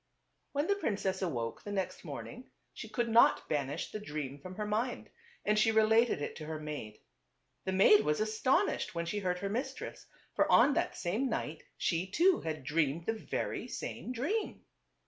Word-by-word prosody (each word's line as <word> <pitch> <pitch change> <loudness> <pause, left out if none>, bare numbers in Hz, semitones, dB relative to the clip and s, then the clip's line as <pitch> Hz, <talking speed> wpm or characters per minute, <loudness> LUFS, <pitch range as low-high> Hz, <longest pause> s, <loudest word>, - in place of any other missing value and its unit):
When 285 +1 +1
the 400 - +3
princess 200 - -1
awoke 120 -11 -2
the 205 - -7
next 195 -2 -3
morning - - -8 0.2
she - - -8
could 240 -2 -1
not 230 +1 +5
banish 145 -1 -2
the 215 - -4
dream 150 -8 -5
from 185 +5 -9
her 210 +1 -3
mind, 225 +4 -2 0.3
and 210 0 +3
she 225 +1 +4
related 220 -5 +4
it - - -4
to 155 - -7
her 155 -1 -4
maid. 150 -9 -6 0.7
The 190 - 0
maid 200 +2 +7
was 150 0 +1
astonished 215 -1 +1
when 170 0 -1
she 205 +5 -2
heard 180 -2 -1
her 200 +2 -3
mistress; 260 +6 -4 0.3
for - - +2
on 290 - +7
that - - -1
same 215 +10 0
night 155 -8 -3 0.2
she 170 +2 0
too 345 - +3
had 155 -3 -3
dreamed 150 +2 0
the 225 - +1
very 220 - -3
same - - -5
dream. 310 - -2
195 Hz, 180 wpm, -32 LUFS, 155-230 Hz, 0.7 s, maid